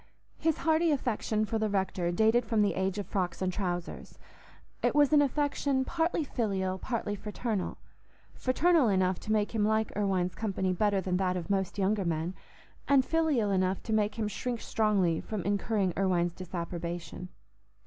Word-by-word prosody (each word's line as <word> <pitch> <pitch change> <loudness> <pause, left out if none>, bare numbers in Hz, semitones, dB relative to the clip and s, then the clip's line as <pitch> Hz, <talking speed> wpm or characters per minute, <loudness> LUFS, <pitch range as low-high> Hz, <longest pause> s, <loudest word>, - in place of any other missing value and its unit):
His 320 -1 +1
hearty 325 +1 +2
affection 225 -6 0
for 225 +1 -2
the 215 -1 0
rector 190 -3 0
dated 220 +6 +3
from 220 -1 +1
the 205 - +1
age 190 0 -1
of 205 - -3
frocks 180 -2 -2
and 185 -1 -1
trousers. 175 -3 -4 0.6
It - - +1
was 295 0 +4
an 295 - +7
affection 280 -1 0
partly 330 +1 0
filial, 195 -8 -2
partly 230 -3 -2
fraternal—fraternal 250 - -1
enough 185 -2 +1
to 215 - -5
make 210 0 +1
him 220 -2 +1
like 220 +1 +1
Irwine's 190 -3 0
company 190 -4 -1
better 200 +1 +1
than 185 0 -1
that 185 -1 0
of 180 +2 -4
most 190 0 -1
younger 200 +1 +1
men, 165 +1 -1 0.5
and 275 -2 +4
filial 305 -11 +1
enough 185 0 0
to 220 - -3
make 210 -1 +1
him 220 -2 -1
shrink 235 +3 -3
strongly 200 -9 +1
from 215 -5 -4
incurring 200 -2 0
Irwine's 175 -3 +1
disapprobation. 175 0 -5
205 Hz, 160 wpm, -30 LUFS, 185-230 Hz, 0.6 s, an